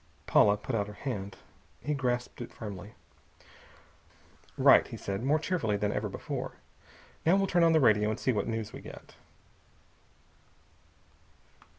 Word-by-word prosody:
Paula 105 Hz, 0 st, +5 dB
put 110 Hz, +5 st, -6 dB
out 105 Hz, -3 st, 0 dB
her 105 Hz, -, -8 dB
hand. 100 Hz, -6 st, -5 dB, 0.4 s
He 150 Hz, -, -2 dB
grasped 125 Hz, -3 st, -2 dB
it 120 Hz, -, -7 dB
firmly. 105 Hz, -2 st, -8 dB, 1.6 s
"Right!" -, -, +6 dB
he -, -, -8 dB
said, 100 Hz, +3 st, -4 dB
more 145 Hz, +4 st, +3 dB
cheerfully 155 Hz, -, -1 dB
than 105 Hz, 0 st, 0 dB
ever -, -, -2 dB
before. -, -, -5 dB, 0.7 s
"Now 170 Hz, +4 st, +4 dB
we'll 195 Hz, 0 st, +2 dB
turn 175 Hz, -2 st, +2 dB
on 165 Hz, -1 st, +5 dB
the 160 Hz, -, +5 dB
radio 105 Hz, -5 st, +4 dB
and 110 Hz, -, -3 dB
see 130 Hz, -, +1 dB
what 105 Hz, -4 st, -1 dB
news 115 Hz, -2 st, -3 dB
we -, -, -8 dB
get." -, -, -12 dB
115 Hz, 150 wpm, -30 LUFS, 105-145 Hz, 1.6 s, Right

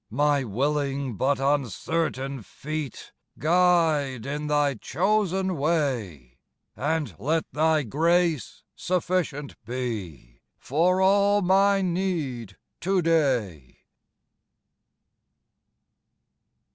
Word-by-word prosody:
My 145 Hz, +3 st, +2 dB
willing 140 Hz, +2 st, -1 dB
but 135 Hz, +7 st, +1 dB
uncertain 135 Hz, -, -1 dB
feet 150 Hz, +6 st, -6 dB, 0.3 s
Guide 160 Hz, -7 st, +2 dB
in 150 Hz, +2 st, -3 dB
Thy 145 Hz, -1 st, +2 dB
chosen 190 Hz, -, 0 dB
way; 120 Hz, -, -2 dB, 0.4 s
And 150 Hz, -, -1 dB
let 155 Hz, +8 st, 0 dB
Thy 155 Hz, 0 st, +2 dB
grace 165 Hz, -, 0 dB
sufficient 175 Hz, -7 st, -2 dB
be 105 Hz, -, -6 dB, 0.2 s
For 175 Hz, +7 st, +1 dB
all 200 Hz, +1 st, +4 dB
my 195 Hz, +2 st, +3 dB
need 160 Hz, -, -2 dB, 0.2 s
to 190 Hz, 0 st, +1 dB
day. 125 Hz, -, 0 dB
150 Hz, 80 wpm, -25 LUFS, 130-175 Hz, 0.4 s, all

